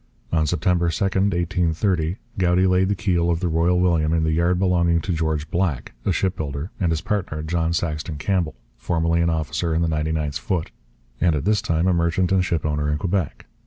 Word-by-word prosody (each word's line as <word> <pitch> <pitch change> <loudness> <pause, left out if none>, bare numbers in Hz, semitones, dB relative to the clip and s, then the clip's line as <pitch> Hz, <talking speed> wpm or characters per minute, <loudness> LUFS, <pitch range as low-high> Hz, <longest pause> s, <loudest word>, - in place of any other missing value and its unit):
On 80 -2 +2
September 85 +2 +1
2, 85 - -1
1830, 90 -2 0 0.2
Goudie 90 0 +3
laid 95 0 +3
the 100 - +1
keel 90 -5 +1
of 85 -1 +1
the 90 - -1
Royal 85 +2 +2
William 85 -3 +2
in 80 -1 +2
the 80 - +1
yard 85 +3 +2
belonging 85 -2 +2
to 90 - -2
George 80 -1 -2
Black, 85 -11 -1
a - - +4
shipbuilder, 80 -3 -2
and 85 -4 +1
his 80 -1 -1
partner, 90 -7 -2
John 80 +1 0
Saxton 75 -2 -2
Campbell, 85 -2 -1 0.2
formerly 85 0 0
an 85 - +2
officer 80 +1 -1
in 85 - +1
the - - +1
99th 75 -2 -1
Foot, 85 -1 -2 0.5
and 85 -3 +3
at 75 +1 -2
this 105 0 +2
time 80 +1 0
a 95 - +3
merchant 85 +2 +1
and 95 -1 +3
shipowner 75 -3 -1
in 75 - 0
Quebec. 90 0 -2
85 Hz, 195 wpm, -22 LUFS, 80-90 Hz, 0.5 s, a